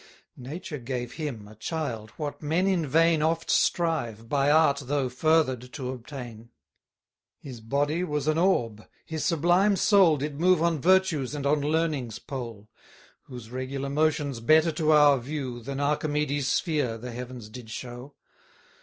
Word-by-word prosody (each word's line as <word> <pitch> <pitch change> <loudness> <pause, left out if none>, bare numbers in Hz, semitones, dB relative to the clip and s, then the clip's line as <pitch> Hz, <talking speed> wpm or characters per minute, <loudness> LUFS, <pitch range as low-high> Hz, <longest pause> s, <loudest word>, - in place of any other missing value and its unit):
Nature 150 +3 -7
gave 125 -1 -4
him, 130 -10 -6
a 105 - -13
child, 115 -2 -4
what 150 -2 -5
men 160 +5 +1
in 180 -5 +1
vain 165 +2 +3
Oft 165 +1 0
strive, 120 -10 0
by 140 +2 +1
art 150 -2 +4
though 135 -1 0
further'd, 130 -3 +1
to 130 -4 -4
obtain. 120 -3 -9 0.9
His 125 -5 -10
body 145 +8 0
was 150 -4 -2
an 155 +1 +2
orb, 115 - +1 0.2
his 160 -1 -4
sublime 175 +5 +3
soul 190 -5 +4
Did 145 +1 -4
move 180 +1 +4
on 165 -4 +1
Virtue's 170 -7 +2
and 140 -1 -4
on 145 +1 +2
Learning's 150 -6 -1
pole: 115 -6 -7 0.6
Whose 120 -3 -10
regular 130 +2 -4
motions 145 -3 0
better 155 +7 +4
to 155 -1 +1
our 145 -3 +6
view, 130 -2 -5
Than 140 +3 -5
Archimedes 145 -1 0
sphere, 145 -10 0
the 125 +2 -7
Heavens 125 -1 -7
did 115 +1 -11
show. 125 +4 -8
145 Hz, 150 wpm, -27 LUFS, 125-160 Hz, 0.9 s, our